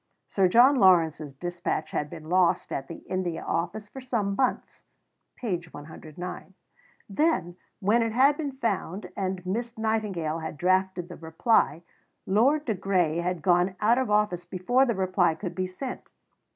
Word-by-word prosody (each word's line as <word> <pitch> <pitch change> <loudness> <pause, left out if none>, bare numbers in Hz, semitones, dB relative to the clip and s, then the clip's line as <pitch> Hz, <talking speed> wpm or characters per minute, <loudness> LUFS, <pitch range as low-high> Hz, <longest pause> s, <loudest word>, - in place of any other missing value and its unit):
Sir 195 -2 +2
John 250 +8 +6
Lawrence's 160 - +3
dispatch 175 -1 -3
had 150 - -2
been 155 +1 -10
lost 180 +1 +2
at 135 - -3
the 165 - -9
India 185 -3 -3
Office 175 +6 -3
for 265 - -10
some 220 -6 -1
months 260 +2 -1 0.5
(p. 190 -8 -2
109). 160 +5 -9 0.5
Then, 205 - 0 0.2
when 220 +4 +3
it 230 -1 0
had 270 +5 +4
been 290 -3 -4
found 200 -6 -3
and 185 -2 -3
Miss 235 +5 -3
Nightingale 205 -8 -1
had 160 -1 -6
drafted 185 0 +1
the 175 - -10
reply, 165 - +1 0.4
Lord 270 +10 +3
de 225 - 0
Grey 185 -4 0
had 175 -2 -2
gone 180 +2 +3
out 230 +4 +3
of 260 - -1
office 210 -4 +1
before 190 +10 +1
the 235 - 0
reply 185 -3 +2
could 180 -1 -5
be 185 0 -2
sent 250 +8 -6
(p. - - -33
185 Hz, 160 wpm, -27 LUFS, 175-225 Hz, 0.5 s, John